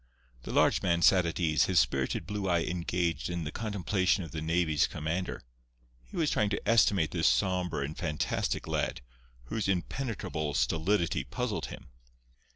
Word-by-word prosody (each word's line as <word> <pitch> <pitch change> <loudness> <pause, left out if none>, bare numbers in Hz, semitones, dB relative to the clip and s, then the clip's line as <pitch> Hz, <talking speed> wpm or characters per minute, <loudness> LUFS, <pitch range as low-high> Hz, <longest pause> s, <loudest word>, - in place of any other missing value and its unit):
The - - -7
large - - +3
man 85 -1 +1
sat 90 -3 +5
at 85 - -3
ease, 80 -3 +3
his 90 -3 +3
spirited 65 -2 0
blue 105 -2 -3
eye 85 -2 +2
engaged 85 -3 -1
in 85 -1 -3
the 75 - -4
contemplation 100 -2 0
of 80 - -9
the 80 - -4
navy's 80 -1 +2
commander. 80 +5 -3 0.6
He - - -11
was 160 -3 +1
trying 105 - +2
to 100 - -3
estimate 100 -8 +4
this 85 -3 +2
sombre 90 -7 +1
and 75 +2 -6
fantastic 80 -4 -2
lad, - - -1 0.4
whose 105 - -3
impenetrable 90 - -2
stolidity 80 +8 +1
puzzled - - -3
him. - - -10
85 Hz, 160 wpm, -30 LUFS, 80-95 Hz, 0.6 s, sat